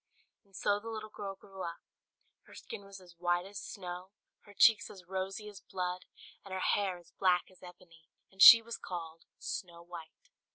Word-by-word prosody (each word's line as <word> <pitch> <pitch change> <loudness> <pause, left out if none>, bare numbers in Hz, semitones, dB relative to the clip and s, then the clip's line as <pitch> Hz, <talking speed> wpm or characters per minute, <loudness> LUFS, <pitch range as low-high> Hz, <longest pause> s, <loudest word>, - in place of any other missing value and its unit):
And 195 -2 -22
so 205 +2 +1
the 225 +2 -8
little 215 -1 -6
girl 200 -2 -6
grew 195 0 -12
up: 170 -2 -5 0.6
her - - -14
skin 200 - -8
was 195 -1 -11
as 175 -2 -18
white 175 0 +1
as 200 0 -7
snow, 180 -1 -7 0.4
her 205 - -15
cheeks 225 +2 +6
as 185 -3 -12
rosy 190 +3 -4
as 205 -1 -10
blood, 180 -1 -4 0.4
and 195 - -12
her 190 - -2
hair 190 -1 +1
as 175 - -18
black 180 -1 +2
as 185 - -21
ebony; 170 -3 -15 0.2
and 190 0 -8
she 230 +2 +12
was 235 +1 -6
called 165 -2 -7
Snow 170 -2 -6
White. 170 -2 -12
185 Hz, 190 wpm, -33 LUFS, 175-200 Hz, 0.6 s, she